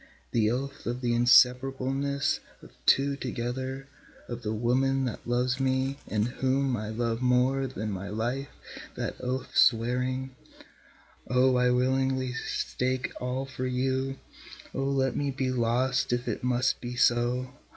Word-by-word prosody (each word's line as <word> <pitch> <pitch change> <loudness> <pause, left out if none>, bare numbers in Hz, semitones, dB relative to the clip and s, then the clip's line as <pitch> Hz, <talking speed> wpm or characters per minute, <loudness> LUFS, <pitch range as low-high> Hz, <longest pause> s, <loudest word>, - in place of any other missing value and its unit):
The 110 -2 +2
oath 135 +3 -4
of 120 +2 -2
the 120 -2 +1
inseparableness 135 +4 +3 0.2
of - - -13 0.2
two 140 +1 +4
together, 130 +1 -4 0.4
of 120 0 -6
the 105 -3 -3
woman 130 +4 +1
that 120 - -5
loves 125 +2 +1
me 135 +1 0
and 105 +1 0
whom 130 +1 0
I 105 -1 -4
love 115 +1 -2
more 130 +2 +2
than 110 -4 -4
my 95 0 -5
life, 120 +6 -2 0.5
that - - -3
oath 130 +1 -3
swearing, 125 +2 +2 0.9
(O 125 +1 +3
I 125 0 +3
willingly 130 0 +1
stake 130 0 -2
all 125 +2 -2
for 130 -1 -4
you, 130 +1 -1 0.6
O 135 - -1
let 135 -1 +1
me 145 -1 0
be 130 -1 -1
lost 125 +2 +1
if 120 0 -1
it - - -3
must 125 +1 +1
be 125 0 -5
so! 120 +2 +2
130 Hz, 140 wpm, -28 LUFS, 120-135 Hz, 0.9 s, two